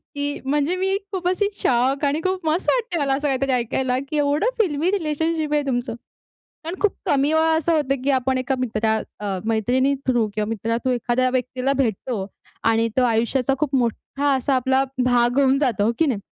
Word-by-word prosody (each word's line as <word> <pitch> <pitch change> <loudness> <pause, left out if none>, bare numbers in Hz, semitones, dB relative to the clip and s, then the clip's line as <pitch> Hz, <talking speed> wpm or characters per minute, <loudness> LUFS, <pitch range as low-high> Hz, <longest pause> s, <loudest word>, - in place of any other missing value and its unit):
की 285 0 -2
म्हणजे 295 +5 +1
मी 385 +1 0
खूप 365 -3 -2
अशी 370 +3 +1
शॉक 260 +4 +2
आणि 290 +3 0
खूप 370 -2 -2
मस्त 320 +4 +1
वाटते 475 -7 0
मला 275 -2 +1
असं 290 +2 -1
काहीतरी 270 0 0
ऐकायला 250 +1 0
की 305 - -2
एवढं 295 +9 +2
फिल्मी 335 -2 0
रिलेशनशिप 320 -3 -1
आहे 295 - +3
तुमचं. 245 -3 -2 0.7
कारण 335 +2 -4
खूप 420 - +2
कमी 285 +2 +2
वेळा 320 0 +3
असं 325 +1 +1
होतं 275 -3 -1
की 280 - +1
आपण 260 0 0
एका 255 +1 -1
मित्रा 220 -3 0 0.2
अ, 200 -2 -2
मैत्रिणी 245 +5 +1
थ्रू 240 -4 +2
किंवा 215 -1 -1
मित्रा 225 +1 -2
थ्रू 260 - +2
एखाद्या 245 +1 +1
व्यक्तीला 255 +1 -1
भेटतो. 220 -2 -2 0.4
आणि 225 0 +3
तो 260 - +4
आयुष्याचा 240 +3 +1
खूप 290 -2 -1
मोठा 270 +4 -1
असा 265 +1 0
आपला 265 +1 +2 0.2
भाग 245 0 +2
होऊन 270 -1 +4
जातो 240 -8 +1
हो 225 - +2
की 325 - +3
नाही? 245 -8 -1
270 Hz, 190 wpm, -22 LUFS, 245-300 Hz, 0.7 s, तो